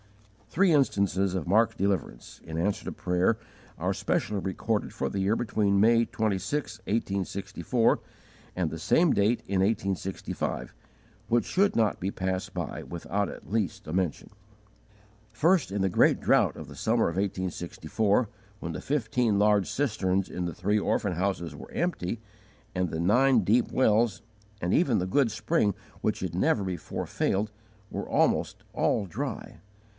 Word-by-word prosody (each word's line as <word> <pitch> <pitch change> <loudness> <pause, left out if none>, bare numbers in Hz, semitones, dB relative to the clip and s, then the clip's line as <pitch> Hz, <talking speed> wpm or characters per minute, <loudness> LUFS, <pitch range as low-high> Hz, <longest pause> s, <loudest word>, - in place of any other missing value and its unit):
Three 185 +3 +3
instances 100 -9 +2
of 90 -5 -2
marked 110 +4 +3
deliverance, 90 - -2
in 80 0 -6
answer 95 +5 0
to - - -3
prayer, 90 +5 +1 0.4
are - - 0
specially 105 -1 -1
recorded 95 -1 -2
for 70 - -2
the 100 - -3
year 100 +3 +2
between 105 -4 +1
May 115 +2 +5
26, 110 +4 -2
1864, 100 +2 0 0.6
and 90 -3 0
the 80 - -6
same 165 - +3
date 110 +4 +2
in 95 -1 +1
1865, 95 -2 -2 0.6
which 120 0 +3
should 200 +2 +2
not 110 -4 +2
be 95 +2 -1
passed 95 -1 -3
by - - -4
without 95 +4 -2
at - - -10
least 105 -6 -2
a 75 - -4
mention. 90 -4 -1 1.0
First, 160 - +2
in 100 0 -1
the 95 - +3
great 90 - +4
drought - - +3
of - - -8
the - - -11
summer - - +1
of 85 - -3
1864, 95 +3 0 0.3
when 85 -1 -5
the - - -5
fifteen 120 -6 +1
large 105 -2 +3
cisterns 100 -8 0
in 90 - -3
the 85 - -3
three 105 +3 +1
orphan 100 -1 0
houses 85 -3 -2
were - - -11
empty, 115 - -2 0.6
and 90 -1 0
the 80 - -4
nine 120 +7 +4
deep 115 +5 +3
wells, 110 -6 +2 0.4
and 90 0 -1
even 135 -9 +3
the 90 - 0
good 115 +5 +2
spring 105 -1 +1 0.3
which - - 0
had - - -3
never 100 - +2
before 90 -4 -4
failed, 105 +2 0 0.4
were - - -5
almost - - +1
all 105 - +1
dry. 85 - -5
100 Hz, 155 wpm, -28 LUFS, 95-115 Hz, 1.0 s, May